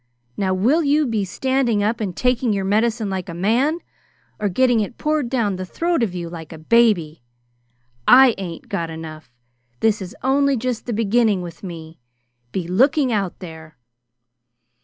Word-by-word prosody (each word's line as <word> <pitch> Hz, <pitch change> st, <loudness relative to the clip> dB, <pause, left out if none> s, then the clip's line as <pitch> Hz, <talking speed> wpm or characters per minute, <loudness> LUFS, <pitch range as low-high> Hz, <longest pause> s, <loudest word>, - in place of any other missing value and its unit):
Now 190 Hz, +2 st, 0 dB
will 250 Hz, -, +2 dB
you 295 Hz, +1 st, +2 dB
be 225 Hz, -5 st, -1 dB
standing 245 Hz, +1 st, 0 dB
up 220 Hz, +2 st, -1 dB
and 190 Hz, -5 st, -4 dB
taking 250 Hz, -2 st, +1 dB
your 195 Hz, -1 st, -2 dB
medicine 220 Hz, +2 st, +1 dB
like 190 Hz, -2 st, -4 dB
a 170 Hz, -, -6 dB
man, 245 Hz, -, +1 dB, 0.6 s
or 205 Hz, -, 0 dB
getting 245 Hz, +4 st, +3 dB
it 215 Hz, +2 st, -3 dB
poured 305 Hz, -5 st, -1 dB
down 220 Hz, -7 st, 0 dB
the 185 Hz, -, -4 dB
throat 335 Hz, -, -1 dB
of 200 Hz, -6 st, -1 dB
you 175 Hz, -1 st, -4 dB
like 165 Hz, -2 st, -9 dB
a 160 Hz, -, -8 dB
baby? 170 Hz, -, +2 dB, 0.9 s
I 255 Hz, -1 st, +8 dB
ain't 170 Hz, -4 st, -7 dB
got 170 Hz, -5 st, -3 dB
enough! 160 Hz, -3 st, -9 dB, 0.5 s
This 215 Hz, -2 st, +1 dB
is 185 Hz, -1 st, -7 dB
only 275 Hz, +1 st, +2 dB
just 245 Hz, 0 st, -3 dB
the -, -, -2 dB
beginning 215 Hz, -2 st, +2 dB
with 170 Hz, -2 st, -9 dB
me. 165 Hz, -4 st, -9 dB, 0.5 s
Be 175 Hz, +2 st, -3 dB
looking 260 Hz, -, +2 dB
out 200 Hz, -5 st, -1 dB
there!" 160 Hz, -4 st, -10 dB
210 Hz, 165 wpm, -21 LUFS, 180-250 Hz, 0.9 s, I